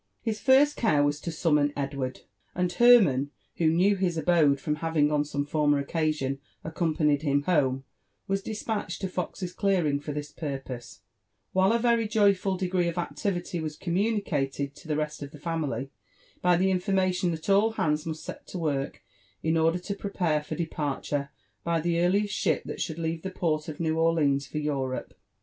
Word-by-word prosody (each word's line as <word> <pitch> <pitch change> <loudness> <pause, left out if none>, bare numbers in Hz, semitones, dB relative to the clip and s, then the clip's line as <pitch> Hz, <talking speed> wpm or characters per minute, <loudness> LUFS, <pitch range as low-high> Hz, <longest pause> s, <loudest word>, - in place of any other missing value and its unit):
His 220 -2 -2
first 275 +5 +5
care 155 -11 +3
was 145 +1 0
to 170 - -4
summon 150 -3 +2
Edward; 135 -2 -3 0.3
and 180 0 0
Hermann, 180 - +5 0.3
who 165 - +2
knew 180 +6 +4
his 185 -3 0
abode 160 -4 +3
from 150 +2 -2
having 155 -2 +1
on 150 -1 +2
some 145 -1 -3
former 145 -1 +2
occasion 140 -2 -1 0.2
accompanied 155 -3 +1
him 145 -2 +1
home, 135 -6 +1 0.4
was 195 0 0
despatched 215 0 -4
to 190 - -1
Fox's 180 0 -4
clearing, 175 -9 +1
for 145 +1 -6
this 150 0 -5
purpose; 135 -6 -6 0.5
while 190 +2 +4
a 230 - +3
very 235 -1 +2
joyful 200 -3 +2
degree 180 -1 0
of 170 +1 -3
activity 175 0 -2
was 155 -1 -4
communicated 170 -8 -1
to - - -15
the 155 - 0
rest 150 0 -3
of 140 - -5
the 150 - -12
family, 145 -5 -3 0.5
by 180 -1 +4
the 190 +2 +2
information 185 -2 +1
thai 180 +5 0
all 215 +3 +3
hands 150 -7 0
must 160 -1 -5
set - - -8
to - - -6
work 145 -5 -2 0.4
in 160 +1 +1
order 165 +1 +3
to 180 +3 -4
prepare 180 -6 -1
for 150 - -6
departure 145 -3 -2 0.3
by 170 -1 +1
the 170 +1 0
earliest 200 +4 +2
ship 165 -8 +1
that - - -6
should 160 - -3
leave 165 0 -2
the 190 - -4
port 160 -4 -1
of 155 - -7
New 160 -1 0
Orleans 150 -4 +2
for - - -6
Europe. 140 -4 -2
160 Hz, 175 wpm, -27 LUFS, 145-185 Hz, 0.5 s, first